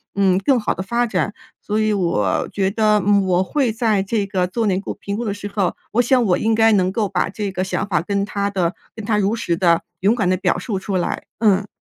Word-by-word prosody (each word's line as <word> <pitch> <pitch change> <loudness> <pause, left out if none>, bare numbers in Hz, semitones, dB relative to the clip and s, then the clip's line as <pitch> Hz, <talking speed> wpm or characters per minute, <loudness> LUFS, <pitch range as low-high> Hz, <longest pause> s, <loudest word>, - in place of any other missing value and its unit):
嗯， 195 -2 +3
更 250 +6 +2
好 215 - -1
的 190 - -4
发 235 +4 0
展。 210 -2 -1 0.3
所 210 +1 -1
以 215 0 +2
我 135 - 0
觉 195 -1 0
得， 215 0 +3
嗯， 200 -1 +3
我 185 0 +2
会 260 +4 0
在 220 -3 +1
这 205 +1 -1
个 190 -2 -1
做 225 +5 -2
内 190 -2 +1
部 195 - -5
评 200 0 -5
估 235 - -3
的 205 - -1
时 205 0 -6
候， 195 -4 0 0.2
我 240 - +4
想 250 +1 +3
我 180 -4 +2
应 225 +1 +1
该 225 0 +5
能 185 -2 +2
够 210 -2 0
把 180 -2 0
这 200 0 -4
个 185 -1 -2
想 190 - -2
法， 175 -6 +1
跟 200 +3 -1
他 200 -1 -2
的 185 -3 -1 0.2
跟 220 - -7
他 210 0 +1
如 205 +2 +1
实 175 -7 -1
地、 170 -2 +3 0.2
勇 200 +4 +3
敢 205 -7 0
地 185 - +2
表 180 -1 0
述 195 +1 -3
出 195 0 -4
来， 180 - -1 0.2
嗯。 205 -2 +3
200 Hz, 270 characters per minute, -20 LUFS, 185-220 Hz, 0.3 s, 该